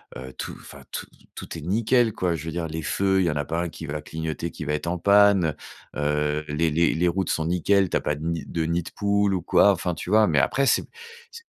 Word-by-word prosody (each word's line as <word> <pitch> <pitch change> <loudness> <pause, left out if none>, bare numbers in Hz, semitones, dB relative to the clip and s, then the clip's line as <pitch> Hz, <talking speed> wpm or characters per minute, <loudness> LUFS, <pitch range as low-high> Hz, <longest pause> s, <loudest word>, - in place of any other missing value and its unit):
heu, 65 +1 -8
tout, - - -5
enfin, - - -13
tout - - -5 0.3
tout - - -7
est - - -7
nickel 110 - +2
quoi. 90 -3 -1
Je 80 0 -7
veux 80 - -4
dire 85 -1 -2
les 80 0 -5
feux, 95 +4 +1
il 95 - +2
y - - +2
en - - -4
a 75 - -1
pas 80 +4 -2
un - - -2
qui 80 - -9
va 75 +1 -4
clignoter, 80 +1 -5
qui - - -8
va 75 0 -2
être 75 +2 -3
en 90 +1 -1
panne. 100 -3 +4 0.4
Heu, 75 +1 0
heu, 75 - -5
les 80 +2 +1
les 85 +3 +2
les 90 +2 +1
routes 95 +1 -1
sont 80 - -1
nickel, 90 +3 +2
tu - - +1
as - - -1
pas 75 - -1
de 75 +2 -7
nids 85 -3 -2
de 85 - -2
nids 85 +2 -1
de - - -9
poules 100 -1 +1
ou 95 - -1
quoi. 100 +3 +4
Enfin, 90 -1 -3
tu 90 - -6
vois? 110 0 +5
Mais 75 -4 +3
après, 140 - +1
c'est - - +3 0.5
c'est 465 -1 -12
85 Hz, 275 wpm, -24 LUFS, 80-95 Hz, 0.5 s, vois